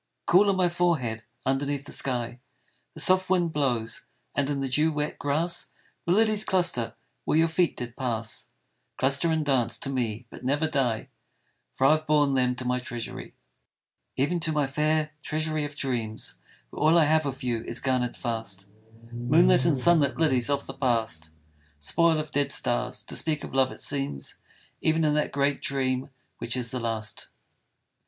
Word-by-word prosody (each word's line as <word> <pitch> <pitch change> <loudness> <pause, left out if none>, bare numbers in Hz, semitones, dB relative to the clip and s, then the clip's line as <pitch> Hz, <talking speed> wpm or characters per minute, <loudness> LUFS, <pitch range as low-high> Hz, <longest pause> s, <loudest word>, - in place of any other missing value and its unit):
Cool 195 +4 +5
on 195 - +3
my 185 -1 +3
forehead 155 -11 0 0.2
underneath 140 +1 -1
the - - -10
sky 120 -2 -2 0.6
The - - -6
soft 185 0 +4
wind 175 -3 +2
blows, 120 -6 -1 0.3
and 140 -1 +1
in 145 -1 -1
the 135 - -1
dew 150 +5 +2
wet 150 0 -3
grass 165 +5 -1 0.4
The - - +2
lilies 215 0 +3
cluster 175 - +1 0.3
where - - +1
your 165 +1 +5
feet 165 +1 +1
did 120 -1 -6
pass, 115 -4 -3 0.5
Cluster 140 +5 +1
and 160 -1 0
dance 125 -5 +1
to 135 - -4
me 120 -3 -2
but - - -11
never 145 +5 +1
die, 130 -7 -1 0.7
For 135 - +2
I 135 - +7
have 155 0 +1
borne 145 -2 +3
them 125 -1 +2
to 125 0 -5
my 125 0 +1
treasury. 120 -2 -6 0.8
Even 160 +7 +1
to 165 -1 0
my 150 -2 +1
fair 150 +2 0
treasury 155 0 -1
of 145 0 -8
dreams, 115 -6 -3 0.4
Where - - -8
all 160 +3 +5
I 160 - +6
have 155 0 +2
of 135 -2 -5
you 120 -3 -1
is 115 - -4
garnered 125 -2 0
fast, 110 -5 -4 0.5
Moonlit 125 +11 +4
and 160 -5 +3
sunlit 150 -1 +4
lilies 135 -6 +2
of 140 0 0
the - - -7
past 115 - -1 0.5
Spoil 160 - +2
of 155 0 -5
dead 140 -1 0
stars, 125 0 0
to - - -8
speak 155 -2 -1
of - - -8
love 130 -1 +3
it - - -9
seems 135 - -1 0.4
Even 160 0 +2
in 150 - +3
that 150 0 0
great 140 0 0
dream 130 -1 -1 0.3
which 120 +2 -1
is 120 -2 -1
the 130 - -2
last. 110 -3 -3
140 Hz, 175 wpm, -27 LUFS, 125-155 Hz, 0.8 s, I